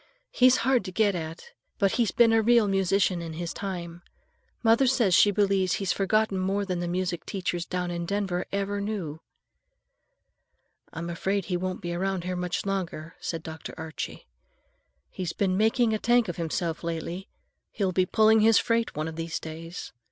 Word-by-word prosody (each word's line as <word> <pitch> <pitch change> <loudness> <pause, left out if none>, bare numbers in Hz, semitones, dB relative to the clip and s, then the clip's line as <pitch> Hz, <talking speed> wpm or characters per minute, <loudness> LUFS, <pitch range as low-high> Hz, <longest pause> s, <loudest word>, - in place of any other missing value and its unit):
He's 255 0 +5
hard 260 -2 +3
to 185 - -5
get 205 +1 +2
at, 165 - -6 0.3
but 195 -3 +2
he's 235 -4 +1
been 230 -1 +4
a 225 - +5
real 230 -1 +4
musician 195 -2 +2
in 165 -1 -6
his 170 +1 -4
time. 175 -3 -5 0.6
Mother 230 +4 +5
says 240 -7 +3
she 205 - +6
believes 195 -2 +2
he's 195 -2 0
forgotten 205 0 +1
more 195 +2 0
than 180 -2 -2
the 175 - -2
music 180 0 -2
teachers 175 -3 -3
down 180 -1 -2
in 170 0 -3
Denver 195 -2 -1
ever 200 0 -1
knew." 190 -8 -4 1.7
"I'm 170 +1 -5
afraid 195 +2 -1
he 180 - -2
won't 185 +1 -3
be 175 -2 -3
around 190 0 -1
here 180 +1 -3
much 180 +1 -2
longer," 180 -5 -3
said 165 -1 -4
Dr. 160 0 -8
Archie. 160 -1 -6 0.9
"He's 180 -3 -4
been 190 -2 0
making 225 +3 +3
a 215 - 0
tank 240 0 +3
of 175 - -4
himself 170 0 -2
lately. 170 +3 -4 0.4
He'll 195 -3 0
be 185 0 +2
pulling 220 +2 +5
his 220 0 +5
freight 230 0 +1
one 155 +1 -2
of 160 0 -7
these 165 -1 -3
days. 165 +2 -8
185 Hz, 175 wpm, -27 LUFS, 170-205 Hz, 1.7 s, she